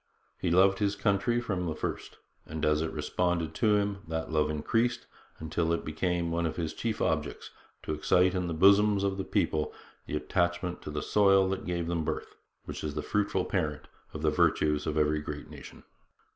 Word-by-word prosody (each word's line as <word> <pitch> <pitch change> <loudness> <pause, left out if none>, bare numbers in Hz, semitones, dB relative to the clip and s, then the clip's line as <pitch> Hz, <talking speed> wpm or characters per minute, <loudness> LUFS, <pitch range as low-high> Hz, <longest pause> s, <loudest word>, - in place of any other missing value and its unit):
He 90 - 0
loved 95 +3 +4
his 100 -1 +1
country 100 +4 +1
from 95 -7 -2
the 80 - -2
first, - - -5 0.3
and, 80 0 -3
as 75 0 +2
it 80 0 -2
responded 80 +1 -1
to 105 +4 +3
him, 100 -1 0
that 80 0 -3
love 75 -1 +2
increased, 115 +11 0 0.3
until 80 +1 -1
it 85 - -1
became 85 +2 -1
one 85 0 0
of 80 - -4
his 80 -3 -3
chief 115 -2 -2
objects - - -2 0.3
to - - -2
excite 90 +4 +3
in 90 -2 -1
the 85 - -3
bosoms 100 +3 +5
of 100 0 -1
the - - -1
people 75 -4 0 0.4
the - - -3
attachment 85 +2 -1
to - - -7
the 75 - -3
soil 100 -2 +4
that 95 0 -3
gave 85 -1 -1
them 85 -1 -1
birth, - - -4 0.3
which - - -6
is 75 -1 -3
the 75 - -2
fruitful 100 -3 0
parent 75 -6 -2 0.2
of 75 - -7
the 75 - +3
virtues 75 0 +2
of 80 0 -1
every 75 0 +2
great 75 0 -7
nation. - - -11
85 Hz, 195 wpm, -29 LUFS, 80-95 Hz, 0.4 s, bosoms